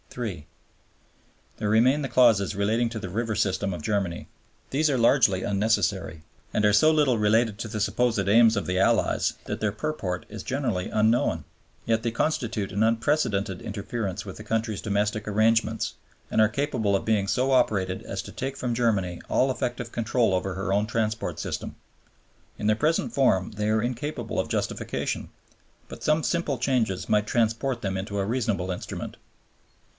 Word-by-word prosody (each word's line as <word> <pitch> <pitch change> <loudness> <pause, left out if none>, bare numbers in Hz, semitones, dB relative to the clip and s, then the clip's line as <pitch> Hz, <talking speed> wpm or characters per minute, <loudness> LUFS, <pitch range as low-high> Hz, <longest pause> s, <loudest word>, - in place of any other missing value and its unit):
(iii.) 100 -11 -4 1.1
There 105 -1 -2
remain 125 +7 +4
the 135 - -3
clauses 110 -6 +4
relating 110 +4 +1
to 115 -1 -5
the 100 - -5
river 110 +4 -2
system 100 0 0
of 85 -4 -7
Germany. 95 -4 -2 0.4
These 155 +3 +2
are 135 - +1
largely 115 -6 +4
unnecessary 100 -6 0 0.3
and 105 - +2
are 105 - +4
so 155 +10 +6
little 145 -6 +3
related 110 0 +2
to - - -4
the 105 - -4
supposed 110 -1 +1
aims 110 +1 +5
of 100 - -1
the 90 0 0
Allies 95 - +2
that - - -4
their 105 -1 +1
purport 105 -7 -3
is 105 -2 -8
generally 120 -9 -2
unknown. 110 +3 +1 0.4
Yet 115 0 +1
they 115 - 0
constitute 115 -6 -1
an 100 +2 +2
unprecedented 110 -5 +1
interference 105 -1 -4
with 95 0 -8
a - - -7
country's 110 0 -2
domestic 105 +1 -1
arrangements 110 +2 +2 0.4
and - - +2
are 110 - +5
capable 120 -5 0
of 95 - -1
being 105 -3 +1
so 130 +6 +1
operated 100 -7 +2
as - - -5
to - - -9
take 135 +1 -4
from 125 -2 -2
Germany 100 -7 0
all 130 - +3
effective 120 -2 -3
control 115 -2 +1
over 95 0 -1
her 95 0 -2
own 105 +2 +1
transport 110 0 -2
system. - - -4 0.8
In 105 - -2
their 110 - +4
present 155 +8 0
form 115 -8 +2
they 105 0 -2
are 110 0 +2
incapable 125 +5 -3
of - - -1
justification; - - -2 0.6
but - - -10
some 155 +1 +2
simple 170 -5 0
changes 120 -7 0
might 105 0 +2
transform 115 +3 +1
them 95 -1 -2
into 100 +2 -4
a 100 - 0
reasonable 110 -6 -1
instrument. 90 - -6
110 Hz, 170 wpm, -26 LUFS, 100-120 Hz, 1.1 s, so